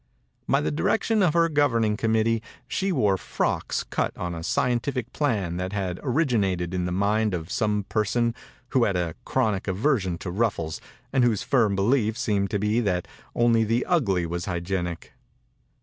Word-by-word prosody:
By - - +3
the 75 - -1
di 75 - -3
rection 225 -1 +2
of 175 -5 +3
her 170 0 +5
governing 120 -9 +2
com 110 +1 0
mittee 115 0 +2 0.3
she 195 0 -1
wore 105 - +2
frocks - - -1
cut - - -2
on 90 -1 -3
a 85 - -5
scientific 125 +5 -1
plan 100 - 0
that 90 +2 -3
had 95 -3 -2
origi 130 -3 +1
nated 90 -3 -1
in 90 -1 -1
the 90 - -2
mind 105 +2 +1
of 80 0 -6
some 105 -3 0
per 110 - +1
son 115 +3 0 0.4
who 130 -4 +3
had 100 - 0
a 85 -2 -1
chronic 105 -3 0
aversion 95 - +1
to 90 - -5
ruffles 95 -6 -1 0.3
and 130 - +3
whose 115 -5 +2
firm 115 -7 +2
belief 110 +2 +2
seemed 100 -3 0
to 105 - 0
be 105 +3 +1
that 95 -6 0 0.3
only 115 -1 +4
the 115 +3 0
ugly 100 - +1
was 85 +1 -3
hygienic. 85 -1 -3
105 Hz, 180 wpm, -25 LUFS, 90-120 Hz, 0.4 s, her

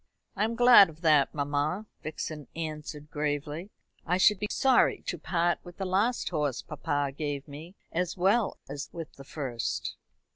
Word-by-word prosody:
"I 205 +2 +2
am 230 +1 -2
glad 240 -5 +8
of 160 +1 -14
that, 155 -4 +4
mamma," 145 +7 -1 0.2
Vixen 155 -1 -5
answered 150 -2 -6
gravely. 150 +4 -2 0.3
"I 180 +2 +1
should 195 +1 +5
be 210 - -1
sorry 265 -2 +3
to 175 - -3
part 175 0 +1
with 175 0 -12
the 195 - -3
last 205 +7 +1
horse 150 -6 -1
papa 145 -3 -2
gave 145 -1 -3
me 155 +6 -10 0.2
as 180 +2 -1
well 200 +4 +2
as 140 +1 -6
with 165 -2 -7
the 135 - -12
first." 130 -5 -3
160 Hz, 160 wpm, -29 LUFS, 145-185 Hz, 0.3 s, glad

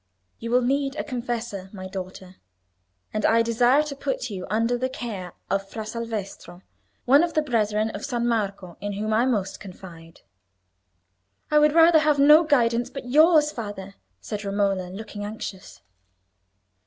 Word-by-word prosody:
You 230 - -5
will 250 +1 +3
need 275 +2 0
a - - -3
confessor, 235 -6 -4
my 185 -2 -8
daughter, 185 0 -8 0.8
and 215 - -2
I 230 +1 +4
desire 240 +5 +3
to 300 -2 -6
put 270 -3 -3
you 185 -2 -6
under 230 +4 +1
the 255 +2 -2
care 205 -9 -6
of 195 0 -2
Fra 220 +1 -6
Salvestro, 215 -5 -6 0.4
one 280 +5 +6
of 345 - -2
the 310 - +3
brethren 215 -4 0
of 205 - -7
San 240 -3 -1
Marco, 200 -6 -2
in 205 0 -3
whom 215 +2 -2
I 235 +4 +3
most 200 -6 -1
confide." 175 -4 -12 1.3
"I 300 - +5
would 300 +1 +3
rather 330 -1 +7
have 305 -1 +2
no 300 +4 +7
guidance 240 -6 +2
but 250 -3 -8
yours, 305 0 +5
father," 205 -5 -7 0.3
said 210 -1 -6
Romola, 195 -2 -1
looking 205 +2 -8
anxious. 205 -2 -8
225 Hz, 155 wpm, -24 LUFS, 195-260 Hz, 1.3 s, rather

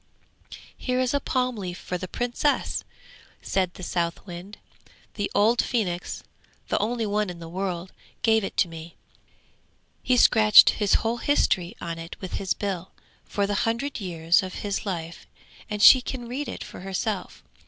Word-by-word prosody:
'Here 250 0 -1
is 255 0 +1
a 285 - +2
palm 255 -2 -1
leaf 180 -3 -5
for 180 - -5
the 185 +1 -4
Princess!' 245 +7 -1 0.6
said 185 -2 0
the 185 - -10
Southwind. 175 +3 -4 0.6
'The 205 -1 -2
old 225 +4 +4
phoenix, 190 -8 -2 0.5
the - - +1
only 230 +2 -1
one 210 -1 0
in 175 - -7
the 165 -1 -9
world, 180 0 -4 0.3
gave 220 -1 +4
it - - -5
to 185 - +4
me. 165 0 -10 1.1
He 255 - +2
has - - +5
scratched 215 -2 +8
his 205 -2 +1
whole 230 +2 +1
history 190 -10 +1
on 165 -1 -5
it 165 +1 -9
with 185 - -5
his 190 - 0
bill, 190 -3 -3 0.4
for 200 - -1
the 205 - -1
hundred 235 +7 -1
years 170 -3 +2
of 185 -1 -6
his 200 +1 -2
life, 170 -3 -5 0.4
and 210 0 -1
she 260 - +10
can 245 -1 -6
read 270 +5 -4
it - - -6
for - - -10
herself. 190 +1 -4
200 Hz, 165 wpm, -25 LUFS, 180-230 Hz, 1.1 s, she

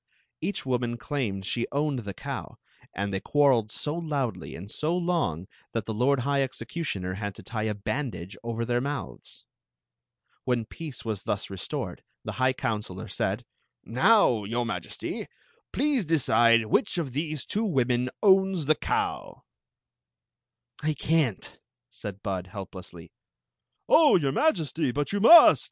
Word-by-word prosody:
Each 205 - -2
woni»i 120 -2 -1
clahned 115 -8 -3
she 120 +4 -1
owned 145 -2 0
the 100 -4 -6
cow, - - -6 0.3
and 100 0 -3
they 95 - 0
quar 145 +5 +3
reled 115 -4 +1
so 145 +6 -3
loudly 140 - -3
and 95 +5 -9
so 165 +4 -1
long 165 - -1 0.3
that 115 -3 -2
the 110 - -3
lord 125 +4 +2
high 140 +2 +1
execu 130 +3 -3
tioner 90 - -3
had 100 -2 -4
to - - -12
tie 110 -1 -3
a 105 - -2
bsMfidage 105 - -4
over 115 0 -3
thek 120 +1 +1
mouths. 140 +1 -6 1.0
Wh«i 120 -3 +1
peace 150 -4 -8
was 110 -4 -3
diHi 100 - -2
mtomi 95 - -4 0.2
the - - -4
ha§^ 130 0 +1
counsdor 105 -7 -4
said: - - -1 0.4
t^m^fmm 120 - +3
Majesty, 90 -8 -4 0.4
pkaie 285 0 +1
<kcide - - -5 0.6
n^Hdi 140 - 0
ai 145 - 0
t^e 155 -5 -4
two 215 - -1
women 125 - +1
owm 190 -4 +4
the 155 - +5
cow." - - -2 0.7
" - - -30
I 155 0 0
can 150 -7 +2
t, - - -9 0.2
" 125 - -64
said 105 -6 -8
Bud, 95 -2 -3
helplessly. 90 -3 -9 0.8
"Oh, 315 -2 +6
your 145 -7 +2
Majerty, 160 - +1
\m 145 - +2
you 205 - +1
must!" 330 +11 +9
125 Hz, 150 wpm, -27 LUFS, 105-150 Hz, 1.0 s, must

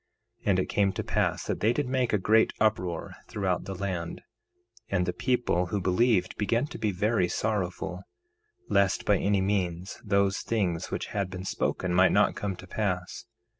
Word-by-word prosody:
1:7 - - -11
And 95 - +4
it 95 - +1
came 100 -1 +2
to - - -3
pass - - 0
that - - -2
they 110 - +3
did 145 +2 -1
make 130 -2 +1
a 105 - +3
great 110 +3 +3
uproar 90 -6 0
throughout 95 -4 -1
the 95 - -5
land; 90 -3 -4 0.7
and 90 -3 +1
the 90 - -1
people 120 -6 +1
who 100 +3 -1
believed 95 +1 +2
began 115 +5 +1
to - - -9
be 110 - +1
very 100 0 +1
sorrowful, 95 -3 -2 0.7
lest 100 -2 +2
by 100 -2 +3
any 100 -1 +2
means 95 -2 -2
those 100 -1 +2
things 95 -8 -1
which - - -3
had 100 -3 -1
been 95 0 -6
spoken 90 -1 -1
might 90 +1 +5
not - - +4
come 100 -2 -3
to 90 - -11
pass. 90 -2 -3
100 Hz, 180 wpm, -28 LUFS, 90-105 Hz, 0.7 s, might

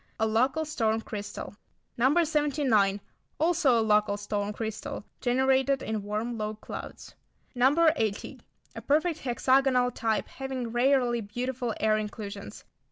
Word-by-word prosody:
A 220 - +3
local 255 +8 +1
storm 225 -7 0
crystal. 205 -1 -7 0.4
No. 270 +8 +3
79. 275 -10 +2 0.4
Also 315 -7 +3
a - - +2
local 210 -1 +3
storm 205 0 -2
crystal, 220 -1 -5
generated 265 +2 +2
in 220 -1 -2
warm, 215 +3 -3
low 215 0 -3
clouds. 215 - -9 0.4
No. 280 +7 +4
80. 215 -6 -3 0.4
A - - -6
perfect 315 +3 +1
hexagonal 255 0 +2
type 225 -3 -1
having 265 -3 -5
rarely 245 -1 +2
beautiful 245 +2 -3
air 215 0 +2
inclusions. 210 -1 -7
240 Hz, 125 wpm, -28 LUFS, 215-270 Hz, 0.4 s, No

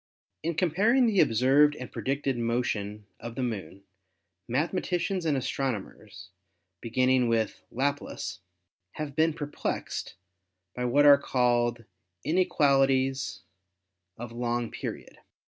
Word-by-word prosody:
"In 165 +1 -2
comparing 200 - +3
the 215 -4 +2
observed 135 +6 +4
and 125 - -8
predicted 135 0 -1
motion 110 -3 -2
of 115 0 -7
the 130 - -2
Moon, 100 -5 -5 0.6
mathematicians 175 +6 -1
and 145 -3 +2
astronomers, 110 -7 -4 0.5
beginning 130 +1 +2
with 115 -2 0
Laplace, 140 -6 -3 0.5
have 150 -3 -5
been 160 0 +3
perplexed 150 -2 -4 0.6
by 125 - -2
what 140 +4 +4
are 140 -1 +8
called 120 -3 +1 0.4
'in 165 +4 +1
equalities 135 -5 +2 0.7
of 120 0 -7
long 120 0 -2
period.' - - -7
130 Hz, 110 wpm, -28 LUFS, 120-150 Hz, 0.7 s, are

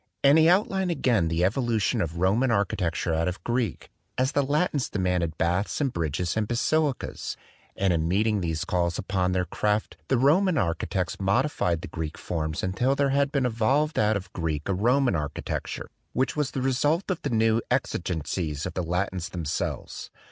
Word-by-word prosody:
And 140 +3 +7
he 160 +1 +6
outlined 190 0 +2
again 120 - +2
the 80 +2 +1
evolution 115 0 +1
of 85 0 -3
Roman 100 +9 +2
architecture 90 -6 0
out 80 +1 +1
of 90 +1 -4
Greek, 120 -5 -2 0.3
as 130 +2 +2
the 145 - +2
Latins 145 0 0
de - - -4
manded 90 -4 0
baths 90 +5 0
and 135 -4 0
bridges 85 +1 -1
and 110 -1 0
basilicas; 140 +4 -1 0.4
and 95 -2 +2
in 80 -1 0
meeting 105 +3 +1
these 80 -2 -2
calls 85 -1 0
upon 95 -1 0
their 90 0 +1
craft 105 +5 -1
the 130 - +2
Roman 160 +7 +3
architects 90 - -1
modified 100 - +1
the - - -5
Greek 80 -2 -5
forms 80 -2 -3
until 120 +9 +1
there 140 0 +2
had 140 +1 +2
been 140 -3 +1
evolved 130 +7 +1
out 110 0 +3
of 95 -2 -10
Greek 80 -3 -2
a 100 - +1
Roman 120 +4 +2
archi 75 -2 -3
tecture, - - -4 0.3
which 130 +2 0
was 150 -3 0
the 130 -3 -3
result 145 +8 +1
of 180 - -3
the - - -2
new 115 0 +2
exigen 90 - -1
cies 75 -5 -3
of 90 - -4
the 90 - -2
Latins 90 +1 -2
themselves. 80 -5 -4
100 Hz, 185 wpm, -26 LUFS, 85-135 Hz, 0.4 s, And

